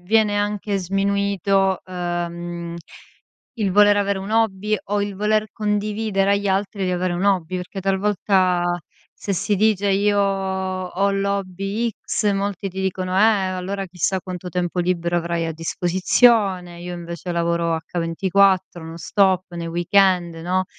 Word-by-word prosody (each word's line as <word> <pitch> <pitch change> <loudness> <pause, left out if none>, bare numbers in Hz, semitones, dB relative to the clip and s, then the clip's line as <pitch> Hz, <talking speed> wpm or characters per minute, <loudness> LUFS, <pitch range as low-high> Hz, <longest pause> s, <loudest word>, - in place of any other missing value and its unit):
viene 210 0 +3
anche 205 -1 -1
sminuito, 195 0 +1
ehm, 175 -1 -4 0.8
il 205 -6 -1
voler 205 0 +6
avere 200 -1 0
un 195 +2 -6
hobby 215 -1 +1
o 205 0 -1
il 200 -1 -4
voler 215 +1 +1
condividere 210 -1 0
agli 200 0 0
altri 195 0 -1
di 180 - 0
avere 180 0 -1
un 180 +3 -2
hobby 185 -3 +1
perché 180 +2 -6
talvolta 190 -2 +1 0.5
se 200 - -4
si 195 +3 0
dice: 205 -1 +2
"Io 205 +1 +2
ho 190 -1 -1
l'hobby 195 +3 -1
x" 210 0 -1
molti 195 -1 -2
ti 190 +1 -6
dicono: 185 -1 -2
"Eh - - +4
allora 195 -2 +1
chissà 185 +1 -1
quanto 180 0 -7
tempo 180 0 -2
libero 175 -1 0
avrai 170 -1 -1
a 165 - -3
disposizione, 180 +2 +2
io 175 0 -6
invece 170 0 -6
lavoro 170 -1 0 0.2
H24, 185 +1 +2
no 165 +1 -8
stop, 185 +1 +1
nei 170 -1 -4
weekend". 175 0 +2
No. 180 +3 -1
190 Hz, 140 wpm, -21 LUFS, 175-200 Hz, 0.8 s, voler